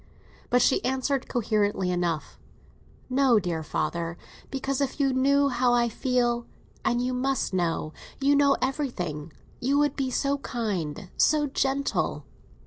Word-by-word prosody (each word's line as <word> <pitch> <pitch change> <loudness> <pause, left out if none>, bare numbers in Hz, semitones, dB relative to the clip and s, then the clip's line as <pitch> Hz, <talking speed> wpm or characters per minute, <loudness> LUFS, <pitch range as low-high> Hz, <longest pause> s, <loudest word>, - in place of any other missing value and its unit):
But 245 0 +4
she - - +3
answered 265 +1 -1
coherently 205 -5 0
enough—"No, 180 - -2
dear 175 -4 -2
father; 170 +2 -2 0.3
because 270 0 -2
if 275 +2 -2
you 275 -2 +2
knew 280 +2 +3
how 245 -1 +2
I 240 -1 +3
feel—and 240 0 -1
you 255 0 -1
must 260 -3 -1
know, 165 -3 -1 0.3
you 280 +1 +3
know 285 -1 +4
everything—you 245 - -3
would 290 -1 +2
be 270 -2 -1
so 280 +2 0
kind, 205 - -3
so 300 -1 +4
gentle." 275 0 -1
250 Hz, 125 wpm, -26 LUFS, 195-275 Hz, 0.3 s, But